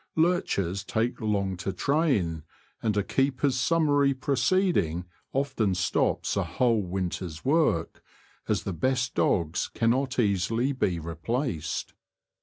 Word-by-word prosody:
Lurchers 100 - +1
take 115 +4 -1
long 100 -3 0
to 95 +2 -3
train, 100 - +1 0.4
and 105 -2 0
a 100 - +2
keeper's 135 +3 +1
summary 145 0 +2
proceeding 130 - +1 0.3
often 130 -8 0
stops 90 0 0
a - - +1
whole 115 -4 +1
winter's 90 -3 -4
work, 140 - +1 0.5
as - - 0
the 95 - -3
best 125 +8 0
dogs 85 -3 +1
cannot 130 +4 0
easily 115 +4 +1
be 95 -10 0
replaced. 85 - -3
115 Hz, 115 wpm, -27 LUFS, 90-135 Hz, 0.5 s, a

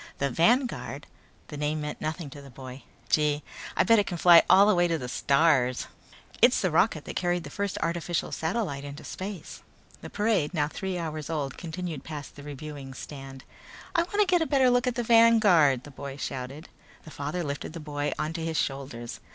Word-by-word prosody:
"The 140 -1 -1
Vanguard?" 240 - +1 0.4
The 150 - -7
name 150 +1 -1
meant 150 0 -5
nothing 155 -1 -4
to 145 - -10
the 140 - -12
boy. 130 +1 -10 0.3
"Gee, 150 -1 +2 0.3
I'll - - +4
bet 230 -1 +6
it 205 - 0
can 175 - -3
fly 170 0 +8
all 190 +3 +8
the 210 - +4
way 175 -1 +3
to 165 -1 0
the 125 -5 -6
stars!" 140 -1 +2 0.6
"It's 245 +2 +6
the 185 - 0
rocket 165 -2 +2
that - - -7
carried 175 -1 0
the - - -9
first 200 -1 -3
artificial 170 0 -2
satellite 160 -5 -2
into 145 0 -8
space." 190 0 -7 0.4
The - - -8
parade, 205 -7 0
now 145 -2 +1
three 190 +3 -4
hours 155 -2 -4
old, 145 -4 -2
continued 170 -4 -6
past 150 -2 -8
the 145 - -10
reviewing 145 -1 -8
stand. 135 -2 -9 0.5
"I 340 - +3
wanna 410 +4 +1
get 360 -2 +3
a 320 - +1
better 265 -3 +4
look 245 +1 +2
at 250 - 0
the 240 - -1
Vanguard!" 215 - +5
the 145 - -11
boy 140 0 -7
shouted. 135 +3 -6 0.4
The 160 - -12
father 150 +6 -3
lifted 145 +1 -5
the 165 - -6
boy 145 -1 -3
onto 160 +2 -3
his 160 -1 -2
shoulders. 130 -4 -4
160 Hz, 195 wpm, -27 LUFS, 145-190 Hz, 0.6 s, fly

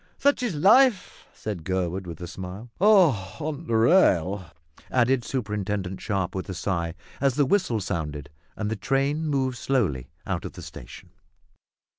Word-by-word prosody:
"Such 285 -1 +2
is 235 -9 -1
life," 210 - +4
said 100 -7 -6
Gurwood 95 +1 -2
with 85 -2 -7
a 90 - -5
smile. 95 +6 -8
"On 155 - +3
the 115 - 0
rail," 100 - +4 0.4
added 125 +1 +3
Mr - - -14
Superintendent 105 -6 -3
Sharp 95 -4 -1
with 95 0 -5
a 95 - -4
sigh, 85 -2 -2 0.2
as 135 -2 +2
the 145 -1 +3
whistle 135 - +1
sounded 75 -6 -4 0.2
and 105 0 -3
the - - 0
train 135 +8 0
moved 130 -4 0
slowly 80 - 0 0.2
out - - -2
of - - -6
the - - -10
station. - - -11
110 Hz, 155 wpm, -25 LUFS, 95-140 Hz, 0.4 s, life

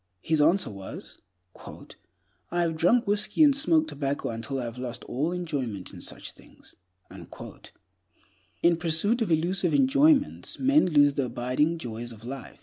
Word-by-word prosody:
His 160 -2 +1
answer 165 - +2
was, 95 -1 -9 1.3
"I 175 0 0
have 165 -1 -1
drunk 230 +10 +3
whiskey 205 +9 +2
and 285 -2 +5
smoked 315 +2 +2
tobacco 140 0 -3
until 115 +4 -4
I - - -3
have 120 +1 -7
lost 125 -2 -6
all 150 +7 -2
enjoyment 140 - -4
in - - -10
such - - -3
things." - - -18 1.9
In 170 -1 +4
pursuit 170 +8 +1
of 225 - 0
elusive 175 +2 +1
enjoyments, 280 +2 +2
men 275 0 +3
lose 145 -4 +4
the 140 -2 -1
abiding 125 +7 -1
joys 120 -4 -6
of 115 0 -13
life. 135 +2 -8
160 Hz, 145 wpm, -26 LUFS, 125-205 Hz, 1.9 s, and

